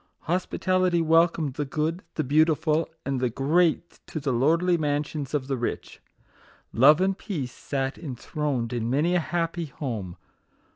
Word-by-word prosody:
Hospitality 185 +1 +1
wel 165 +1 +5
comed 155 -5 -4
the 145 - -2
good, 155 +5 -2
the 155 - 0
beautiful, 155 +2 +2 0.2
and 135 -2 -1
the 125 -1 +1
great 165 +7 +1
to 155 - -4
the 135 -3 -1
lordly 165 +8 +3
mansions 150 -2 -2
of 140 -3 -1
the 135 -1 -2
rich. 120 - -4 0.7
Love 145 +7 +6
and 190 +1 +2
Peace 155 - -4
sat 135 -1 -3
enthroned 135 -4 -3
in 115 -1 -2
many 150 +7 +2
a 180 - +3
happy 170 0 -2
home. 110 - -5
150 Hz, 150 wpm, -26 LUFS, 135-170 Hz, 0.7 s, Love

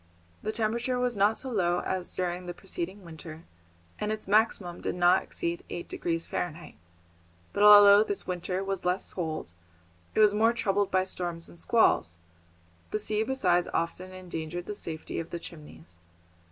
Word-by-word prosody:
The 215 - -2
temperature 235 +3 -1
was 250 -1 0
not 205 +2 +3
so 260 - -6
low 175 -5 +1
as 185 -1 -2
during 180 0 -2
the 175 - -5
preceding 185 +4 -5
winter, 160 0 -10 0.6
and 210 - -1
its 215 -2 -5
maximum 200 -4 +1
did - - -2
not 180 +1 +4
exceed 170 0 -4
eight 175 - -5
degrees 165 -1 -2
Fahrenheit. 170 -1 -4 0.8
But 200 - -1
although 205 0 +9
this 205 -2 -3
winter 180 +1 -3
was 195 -1 -3
less 180 +2 -1
cold, 160 - -4 0.6
it - - +1
was 210 -1 +6
more 225 +2 +3
troubled 205 -4 0
by 185 0 +2
storms 175 -3 -4
and 170 - -16
squalls; 90 - +2 0.7
the - - -1
sea 215 0 0
besides 185 -8 +1
often 180 +2 -2
endangered 175 -2 -6
the 210 - -4
safety 160 -5 -5
of 165 0 -5
the - - -4
Chimneys. 90 - -12
185 Hz, 165 wpm, -28 LUFS, 170-210 Hz, 0.8 s, although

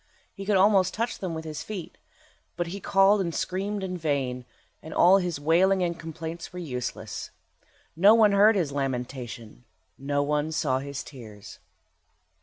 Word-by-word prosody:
He 195 -1 -9
could 205 -2 +3
almost 190 -1 +4
touch 230 +2 -2
them 180 -4 -4
with 160 0 -6
his 155 -1 -5
feet, 200 -6 -7 0.6
but 175 - -1
he 185 +4 -6
called 195 +1 +4
and 170 -3 -3
screamed 195 +2 -2
in 185 -1 -4
vain, 135 -5 -2 0.4
and 160 - -9
all 185 +3 +6
his 175 -5 -3
wailing 180 +5 +3
and 170 -1 -2
complaints 165 +1 -7
were 180 - -9
useless. 130 -8 -5 0.7
No 200 +7 +6
one 215 -2 +5
heard 205 +2 +5
his 170 -7 0
lamentation, 125 -4 -5 0.4
no 145 +1 0
one 150 +1 -1
saw 145 -5 0
his 140 0 -6
tears. 110 -7 -12
165 Hz, 160 wpm, -26 LUFS, 140-195 Hz, 0.7 s, all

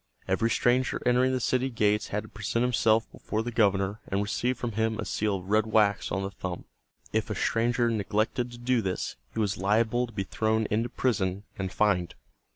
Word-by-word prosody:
Every 110 +5 +1
stranger 125 +3 +2
entering 125 +1 +3
the 130 - 0
city 130 +2 +1
gates 105 -3 +1
had 105 +1 -2
to 110 - -12
present 110 +3 -1
himself 115 -2 +3
before 110 +1 -3
the 120 - -4
governor 100 -2 +2
and 95 - -1
receive 120 +4 -1
from 120 - -3
him 110 +1 0
a - - -3
seal 105 -1 0
of 95 -1 -7
red 110 +1 +3
wax 105 -2 +2
on 95 +2 -1
the 95 - -3
thumb. 95 -2 -6 0.5
If - - 0
a - - -2
stranger 120 +1 +1
neglected 110 +2 0
to 120 - -10
do 120 0 +1
this, 95 -3 -3 0.2
he - - -1
was 100 -3 0
liable 110 +5 +2
to 115 - -14
be 100 -2 -2
thrown 110 +3 0
into 115 +3 +1
prison 100 -7 0
and 95 -1 -3
fined. 95 -5 +1
110 Hz, 200 wpm, -28 LUFS, 100-120 Hz, 0.5 s, entering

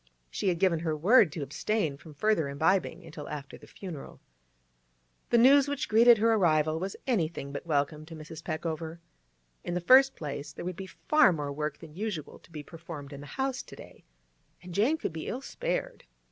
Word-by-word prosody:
She - - -2
had 175 -2 +2
given 175 -2 +2
her 160 -2 -2
word 195 - +5
to 160 - -4
abstain 155 +3 -1
from 150 +1 -14
further 205 -5 +1
imbibing 160 +7 0
until 155 -2 -9
after 145 -2 -7
the - - -15
funeral. 175 -8 -9 1.1
The 235 - +4
news 275 +4 +6
which 285 -1 -2
greeted 230 +2 +7
her 225 +2 +3
arrival 160 -5 +2
was 190 +2 -4
anything 170 - -1
but 145 +4 -7
welcome 150 0 -1
to 165 - -9
Mrs. 155 +1 -10
Peckover. 160 0 -4 0.7
In 175 - -3
the - - +1
first 265 +9 +6
place, 145 -1 -6
there - - -7
would 180 0 -3
be 190 +2 -7
far 305 0 +3
more 145 -4 -3
work 150 0 -3
than 160 -3 -13
usual 185 -5 -5
to - - -22
be 150 -2 -7
performed 160 -3 -9
in 140 - -8
the 145 - -10
house 265 -1 -1
to - - -13
day, - - -14 0.6
and 180 -1 -9
Jane 235 - +2
could 185 - -4
be 160 - -6
ill 255 - -4
spared. - - -4
165 Hz, 195 wpm, -29 LUFS, 150-215 Hz, 1.1 s, greeted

